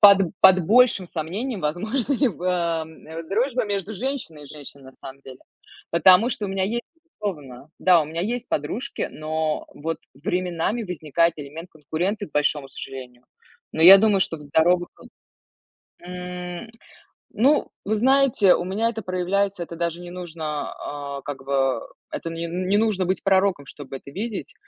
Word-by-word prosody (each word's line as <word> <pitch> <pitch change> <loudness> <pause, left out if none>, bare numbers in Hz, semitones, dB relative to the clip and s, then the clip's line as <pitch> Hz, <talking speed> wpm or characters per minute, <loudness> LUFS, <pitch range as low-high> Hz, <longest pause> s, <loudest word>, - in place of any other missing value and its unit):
Под 200 -1 +9 0.2
под 190 -1 +8
большим 225 -4 +5
сомнением 190 - -4
возможна 215 - -1
ли 270 0 +3
б 180 -4 -7
эм, 165 -3 -2
м, 160 +1 -7
дружба 245 +4 +1
между 205 0 -3
женщиной 235 - -4
и 145 - -11
женщиной, 140 -1 -11
на 130 - -13
самом 135 +1 -11
деле. 130 -2 -12 0.5
Потому 185 +6 +6
что 215 - -3
у - - -5
меня 195 0 0
есть, 235 +5 -2
безусловно. 155 - -7
Да, 180 -3 +5
у 150 - -6
меня 165 +2 -4
есть 240 +3 -3
подружки, 150 - -2
но 155 0 -2
вот 165 +2 -3 0.2
временами 180 - -1
возникает 170 -1 +1
элемент 155 +5 -8
конкуренции, 175 +7 -3
к - - -33
большому 145 -1 +1
сожалению. 125 -2 -9 0.5
Но 160 - 0
я 195 +3 +11
думаю, 205 -2 +3
что 165 - 0
в - - -15
здоровых, 170 +5 +2
кон - - -16 0.9
М, 180 +3 -6 0.7
ну, 280 +6 +3 0.2
вы 215 +2 +1
знаете, 255 -5 +4
у - - -2
меня 205 +5 0
это 225 -1 -5
проявляется, 185 +1 0
это 170 - -9
даже 170 0 -2
не 175 - -8
нужно, 160 -4 -5
а, 140 -1 -6
как 140 -2 -6
бы, 135 -1 +1 0.3
это 165 - -4
не 165 0 -4
не 185 +4 0
нужно 215 -3 +1
быть 185 +2 -1
пророком, 190 -6 +2
чтобы 135 -2 -8
это 140 - -13
видеть. 210 +3 -5
180 Hz, 165 wpm, -23 LUFS, 155-205 Hz, 0.9 s, я